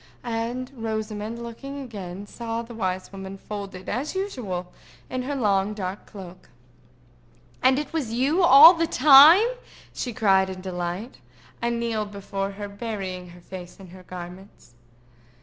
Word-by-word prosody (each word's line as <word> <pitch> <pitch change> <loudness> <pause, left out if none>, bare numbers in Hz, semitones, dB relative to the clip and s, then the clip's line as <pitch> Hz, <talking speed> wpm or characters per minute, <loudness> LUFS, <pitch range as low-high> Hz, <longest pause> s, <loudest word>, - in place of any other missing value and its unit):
And 240 +2 -3
Rosamond, 220 0 -4
looking 275 +5 -7
again, 200 -7 -7
saw 230 +2 -5
the 235 +1 -11
wise 185 -4 -3
woman, 195 0 -8
folded 195 -2 -8
as 270 - -3
usual 215 - -4 0.4
in 255 - -2
her 280 +3 -3
long 205 -4 +1
dark 190 -1 -5
cloak. 185 -3 -12 1.1
"And 260 +1 +4
it 300 +2 -4
was 285 -9 -2
you 275 +10 +1
all 320 0 +10
the 330 -1 0
time?" 305 - +8 0.5
she 245 - -4
cried 195 -4 +3
in 185 -1 -6
delight, 185 +4 -5 0.4
and 235 0 -1
kneeled 220 -3 -2
before 200 0 -4
her, 205 +1 -6
burying 200 -4 -6
her 175 0 -14
face 180 0 -10
in 190 -2 -12
her 185 +1 -13
garments. 180 -6 -11
210 Hz, 145 wpm, -25 LUFS, 190-250 Hz, 1.1 s, all